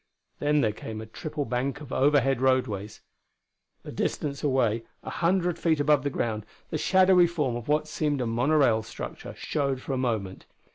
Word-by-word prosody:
Then 150 0 +2
there 110 - +2
came 110 +1 -7
a 110 - -6
triple 145 +6 -5
bank 130 +3 -2
of 145 -3 -9
overhead 135 -2 +3
roadways. 110 -6 0 0.8
A - - -8
distance 140 -1 -2
away, 120 -5 +1 0.2
a - - -6
hundred 175 -1 +1
feet 160 -3 +2
above 145 -1 +4
the 145 - -1
ground 115 -5 -2
level, 105 - -23 0.2
the 155 - 0
shadowy 185 0 +5
form 150 -8 -1
of 120 -1 -6
what 150 +1 +1
seemed 150 -2 -1
a 125 - 0
monorail 120 0 +3
structure 110 - -8
showed 140 -3 -1
for 135 - -5
a - - 0
moment. 110 -7 -2
135 Hz, 180 wpm, -27 LUFS, 120-150 Hz, 0.8 s, shadowy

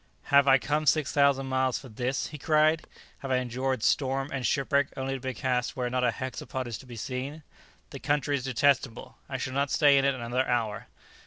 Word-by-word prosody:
"Have 140 0 +6
I 135 0 +7
come 150 +3 -1
six 155 -2 +3
thousand 140 -2 +3
miles 130 -1 0
for 135 - -10
this?" 125 +3 -2
he 150 - -9
cried: 155 +1 +2 0.3
"have 135 - -7
I 130 - +2
endured 130 -1 -2
storm 135 0 +1
and 135 -2 -3
shipwreck 140 -1 +1
only 135 0 -2
to 135 - -4
be 130 0 -4
cast 125 0 -1
where 125 -1 -2
not 125 0 0
a 125 - +4
hexapod 130 +1 -5
is 120 -3 -5
to 130 - -14
be 120 - -9
seen? 135 +6 -5 0.5
The - - -7
country 145 0 0
is 130 -2 -3
detestable! 135 -2 0
I 135 - -3
shall 130 0 -4
not 140 +1 0
stay 140 -1 +5
in - - 0
it 140 -1 +2
another 125 +1 -1
hour!" 115 -4 -1
130 Hz, 215 wpm, -28 LUFS, 125-140 Hz, 0.5 s, I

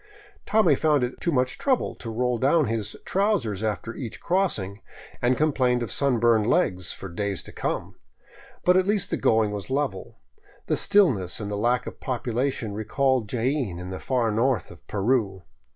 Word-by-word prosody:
Tommy 220 0 +4
found 150 -4 +2
it 125 - -4
too 170 - +1
much 125 -3 0
trouble 265 -3 +1
to 115 - -8
roll 125 +1 0
down 150 +4 +3
his 110 -2 -2
trousers 190 - 0
after 110 +1 -2
each 115 -3 -7
cross 190 +1 +1
ing, 100 +1 -7 0.4
and 125 +1 +2
complained 130 -5 +2
of 110 - -5
sunburned 115 -5 +2
legs 90 - +1
for 95 - -7
days 100 +2 -2
to - - -11
come. - - -3 0.7
But 180 +1 +5
at 185 0 +2
least 205 -2 +1
the - - +1
going 110 -2 +2
was 100 +1 -6
level. 135 -8 -2 0.5
The - - +1
stillness 125 - +2
and 105 -1 -4
lack 120 +4 +1
of - - -8
population 125 -2 -2
recalled 120 +2 0
Jaen 125 - -1
in 90 +1 -7
the 95 - -5
far 120 -4 0
north 115 -1 0
of - - -16
Peru. 100 -3 0
120 Hz, 170 wpm, -25 LUFS, 105-140 Hz, 0.7 s, But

